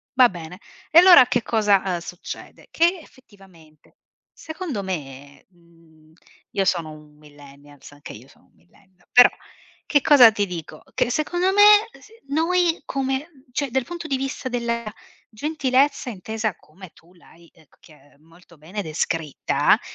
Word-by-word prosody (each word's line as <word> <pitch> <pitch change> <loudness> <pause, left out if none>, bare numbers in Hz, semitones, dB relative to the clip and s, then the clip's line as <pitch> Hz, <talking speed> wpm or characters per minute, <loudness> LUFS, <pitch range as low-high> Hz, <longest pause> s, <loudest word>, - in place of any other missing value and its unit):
Va 250 -2 +6
bene. 175 0 -10 0.3
E 325 - +8
allora 355 -8 +8
che 245 - 0
cosa, 210 -4 +2
uhm, 185 -2 -2
succede: 175 +1 -10
che 345 +3 +1
effettivamente, 190 - -22 0.3
secondo 315 - -7
me, 140 -6 -8
mhmm 170 -2 -26 0.6
io 195 - 0
sono 170 -4 -1
un 150 -1 -16
Millennials 145 -1 -17
anche 145 0 -12
io - - -14
sono - - -24
un - - -34
Millennial, 180 - -30
però 245 0 +7 0.6
che 290 - +2
cosa 260 -6 +7
ti 205 -1 -1
dico: 175 -4 -9
che - - 0
secondo 350 +8 -1
me 415 +2 +6
s - - -19 0.2
noi 335 +3 0
come 270 -1 -2
mhmm, 275 -6 -25
cioè 275 +1 -3
dal 265 +1 0
punto 345 -1 -8
di 270 -3 -1
vista 270 0 -5
della 235 -1 -3 0.5
gentilezza 275 +1 -1
intesa 220 0 -4
come 180 +3 -16
tu 170 +2 -23
l'hai, 170 -1 -21
ehm, 160 -3 -24
c - - -31
chi - - -20
ehm, 145 0 -25
molto 165 +1 -22
bene 180 +7 -7
descritta, 155 -2 -1
200 Hz, 155 wpm, -22 LUFS, 160-270 Hz, 0.6 s, E